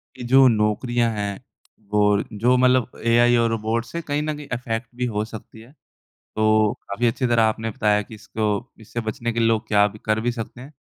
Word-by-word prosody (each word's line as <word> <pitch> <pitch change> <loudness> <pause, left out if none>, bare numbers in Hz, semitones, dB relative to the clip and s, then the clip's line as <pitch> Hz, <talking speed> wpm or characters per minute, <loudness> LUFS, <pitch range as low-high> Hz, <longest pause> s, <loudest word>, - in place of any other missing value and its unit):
कि 125 - -8
जो 135 0 +7
नौकरियाँ 115 +2 +1
हैं 100 -2 -3 0.5
वो 105 - +2 0.4
जो 125 +3 +4
मतलब 125 -1 +2
एआई 120 +1 +4
और 115 0 +2
रोबोट 115 +1 -1
से 170 +7 -5
कहीं 145 -1 -2
न 155 0 -2
कहीं 145 -1 -9
अफैक्ट 115 -1 -4
भी 125 0 -2
हो 105 +1 0
सकती 110 0 -11
है। 120 +4 -16 0.7
तो 110 -1 +3 0.2
काफ़ी 115 +5 -1
अच्छी 125 +2 0
तरह 120 -1 +3
आपने 110 +1 0
बताया 105 0 +1
कि 110 - -12
इसको 110 +1 -4 0.3
इससे 120 +2 -5
बचने 120 +2 -3
के 115 - -4
लिए 115 0 +3
लोग 110 0 0
क्या 105 -1 +4
भी 105 - -13
कर 110 0 +1
भी 120 +1 -1
सकते 115 +1 -7
हैं। 135 +4 -11
115 Hz, 210 wpm, -22 LUFS, 110-120 Hz, 0.7 s, जो